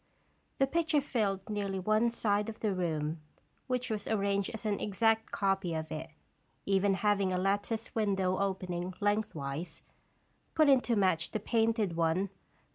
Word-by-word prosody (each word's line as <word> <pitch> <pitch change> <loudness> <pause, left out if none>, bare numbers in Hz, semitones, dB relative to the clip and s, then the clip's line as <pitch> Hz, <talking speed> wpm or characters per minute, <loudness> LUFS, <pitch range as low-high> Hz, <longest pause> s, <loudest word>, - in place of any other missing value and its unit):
The 270 - +4
picture 315 +1 +1
filled 205 -8 -1
nearly 200 -2 -2
one 215 +5 +2
side 210 -2 0
of 220 - -9
the 215 -3 +1
room, 160 -3 -2 0.5
which 250 -1 -1
was 215 -1 -3
arranged 200 -2 +1
as 220 -1 -7
an 205 -2 0
exact 225 +2 +1
copy 195 -4 0
of 160 0 -4
it, 160 +1 -5 0.6
even 195 0 +3
having 200 -1 +2
a 185 - 0
lattice 205 +4 -1
window 195 -4 +1
opening 185 -2 -2
lengthwise, 170 -7 -2 0.7
put 310 -2 +5
in 265 -2 +6
to 240 - 0
match 185 -5 +2
the 215 - -2
painted 225 -4 +1
one. 170 +4 +1
200 Hz, 150 wpm, -31 LUFS, 185-220 Hz, 0.7 s, in